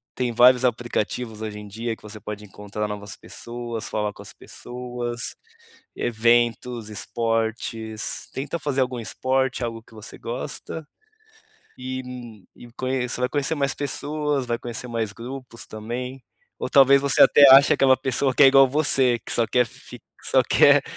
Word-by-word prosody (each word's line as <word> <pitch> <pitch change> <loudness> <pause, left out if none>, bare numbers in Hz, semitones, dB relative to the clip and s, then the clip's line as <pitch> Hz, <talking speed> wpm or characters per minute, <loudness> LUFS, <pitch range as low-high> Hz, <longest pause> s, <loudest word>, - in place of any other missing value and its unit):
tem 125 -1 -1
vários 125 +2 +6
aplicativos 120 -2 -2
hoje 105 -1 -5
em 105 - -10
dia 115 +3 -4
que - - -24
você 105 0 -10
pode 105 0 -7
encontrar 105 +1 -5
novas 105 -1 -6
pessoas, 120 -1 -6
falar 105 -1 -2
com - - -13
as - - -10
pessoas, 120 -1 -6 0.6
eventos, 120 0 +1
esportes, 110 +1 -2
tenta 140 +5 -3
fazer 140 -3 -2
algum 125 -1 -1
esporte, 130 +4 -1
algo 115 -1 -6
que 115 - -21
você 110 -1 -10
gosta, 130 +5 -5 0.9
e 130 0 -5 0.7
conheça 130 -1 -2
vai 125 - +2
conhecer 145 +2 0
mais 140 -1 0
pessoas, 145 0 -2
vai 120 -1 -1
conhecer 120 +1 -6
mais 115 -3 -2
grupos 125 -1 -8
também, 125 +4 -6 0.4
ou - - -3
talvez 140 0 +6
você 140 0 +4
até 145 -1 +8
ache 135 +2 +8
aquela 130 -1 +4
pessoa 130 0 0
que - - +5
é - - +10
igual 135 0 +6
você, 135 -4 +3
que - - -4
só 115 - +2
quer 125 +1 +2
fic - - -13 0.2
que - - -6
só - - +4
quer - - +5
120 Hz, 155 wpm, -23 LUFS, 115-130 Hz, 0.9 s, é